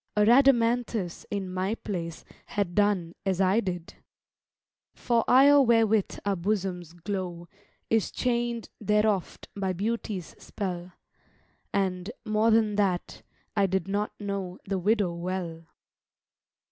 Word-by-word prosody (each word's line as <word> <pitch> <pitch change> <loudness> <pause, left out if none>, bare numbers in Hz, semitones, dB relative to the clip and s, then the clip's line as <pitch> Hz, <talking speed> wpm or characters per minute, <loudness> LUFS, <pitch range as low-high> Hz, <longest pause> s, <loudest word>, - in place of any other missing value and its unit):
A - - +5
Rhadamanthus, 235 -6 +3
in 200 -2 -3
my 190 +4 -1
place, 170 -7 -5 0.2
Had 200 -4 -2
done 200 -5 +1
as 190 -2 0
I 190 +3 +4
did: 180 -5 -4 1.0
For 235 -2 +1
ire 280 +3 +7
wherewith 225 -4 +3
our 200 -1 +1
bosoms 180 -3 -2
glow 175 -1 -5 0.4
Is 225 -2 +2
chain'd 240 -2 -1
there 210 0 +2
oft 200 -5 -1
by 190 -2 -1
Beauty's 205 -2 -3
spell; 180 -3 -5 0.8
And, 185 -1 -1 0.2
more 215 +1 +2
than 220 -2 +3
that, 190 -4 0 0.3
I 200 -2 +3
did 190 -1 -1
not 205 +2 -2
know 200 -3 -4
The 195 -1 -1
widow 200 -1 +2
well. 170 -2 -4
200 Hz, 120 wpm, -27 LUFS, 180-220 Hz, 1.0 s, ire